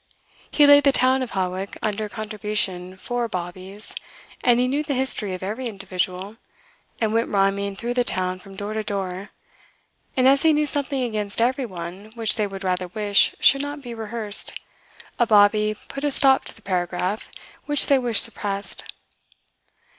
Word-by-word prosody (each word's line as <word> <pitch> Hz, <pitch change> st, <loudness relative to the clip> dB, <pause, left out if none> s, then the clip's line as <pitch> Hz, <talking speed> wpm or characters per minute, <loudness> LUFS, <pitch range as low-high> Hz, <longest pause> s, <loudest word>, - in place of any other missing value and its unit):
He 295 Hz, -, +4 dB
laid 285 Hz, 0 st, +7 dB
the 275 Hz, -, +5 dB
town 260 Hz, 0 st, +3 dB
of 255 Hz, -, -5 dB
Hawick 185 Hz, +1 st, -3 dB
under 215 Hz, 0 st, -2 dB
contribution 210 Hz, -4 st, -3 dB
for 245 Hz, +4 st, -3 dB
bawbees, 185 Hz, +2 st, -5 dB, 0.5 s
and 240 Hz, -1 st, +4 dB
he 250 Hz, -, +2 dB
knew 280 Hz, +3 st, 0 dB
the 290 Hz, -2 st, -2 dB
history 225 Hz, -7 st, +1 dB
of 185 Hz, -, -9 dB
every 220 Hz, +6 st, -3 dB
individual, 195 Hz, 0 st, -4 dB, 0.6 s
and 220 Hz, -2 st, 0 dB
went 230 Hz, +1 st, +1 dB
rhyming 200 Hz, 0 st, 0 dB
through 235 Hz, +4 st, -3 dB
the 245 Hz, 0 st, +2 dB
town 185 Hz, -4 st, -2 dB
from 195 Hz, 0 st, -14 dB
door 205 Hz, +2 st, -5 dB
to 220 Hz, -, -2 dB
door; 195 Hz, -1 st, -4 dB, 0.9 s
and 255 Hz, 0 st, +4 dB
as 275 Hz, +1 st, +5 dB
he 320 Hz, -1 st, +4 dB
knew 300 Hz, 0 st, +2 dB
something 280 Hz, -2 st, -1 dB
against 215 Hz, -4 st, -3 dB
every 255 Hz, +2 st, +1 dB
one 185 Hz, +2 st, -8 dB
which 225 Hz, -2 st, +2 dB
they 210 Hz, -3 st, 0 dB
would 195 Hz, -1 st, -8 dB
rather 185 Hz, -1 st, -1 dB
wish 205 Hz, +2 st, +2 dB
should 275 Hz, -, +5 dB
not 285 Hz, 0 st, -6 dB
be 240 Hz, -2 st, -7 dB
rehearsed, 220 Hz, -2 st, +1 dB, 0.7 s
a 240 Hz, -, +3 dB
bawbee 210 Hz, 0 st, +4 dB
put 275 Hz, -, -7 dB
a 295 Hz, -, +2 dB
stop 270 Hz, -1 st, +4 dB
to -, -, -8 dB
the 225 Hz, -, -19 dB
paragraph 180 Hz, +2 st, -2 dB, 0.4 s
which 290 Hz, -1 st, +3 dB
they 275 Hz, -1 st, +4 dB
wished 240 Hz, -4 st, +3 dB
suppressed. 200 Hz, -3 st, -2 dB
215 Hz, 170 wpm, -23 LUFS, 195-250 Hz, 0.9 s, laid